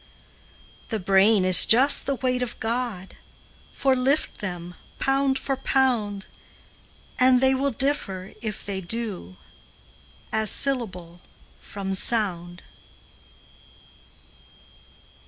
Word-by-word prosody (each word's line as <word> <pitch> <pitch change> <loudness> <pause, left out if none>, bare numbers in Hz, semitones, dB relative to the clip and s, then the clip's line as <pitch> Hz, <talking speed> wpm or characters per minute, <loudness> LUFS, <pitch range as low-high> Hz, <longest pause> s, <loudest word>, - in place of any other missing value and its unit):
The 220 - -3
brain 195 +1 +3
is 185 0 +7
just 265 +5 +6
the 275 - 0
weight 255 -1 -2
of 245 -1 -5
God, 225 -5 -4 0.5
For, 270 -1 0
lift 270 +4 -1
them, 175 -3 -6 0.2
pound 270 0 0
for 270 - -3
pound, 240 -7 -1 0.9
And 255 0 +4
they 265 +1 +3
will 275 +2 0
differ, 225 -8 -3
if 215 -3 -6
they 195 -1 -5
do, 190 - -6 1.0
As 220 -1 +1
syllable 185 -11 0 0.4
from 195 -1 -6
sound. 185 -4 -2
225 Hz, 100 wpm, -23 LUFS, 190-260 Hz, 1.0 s, is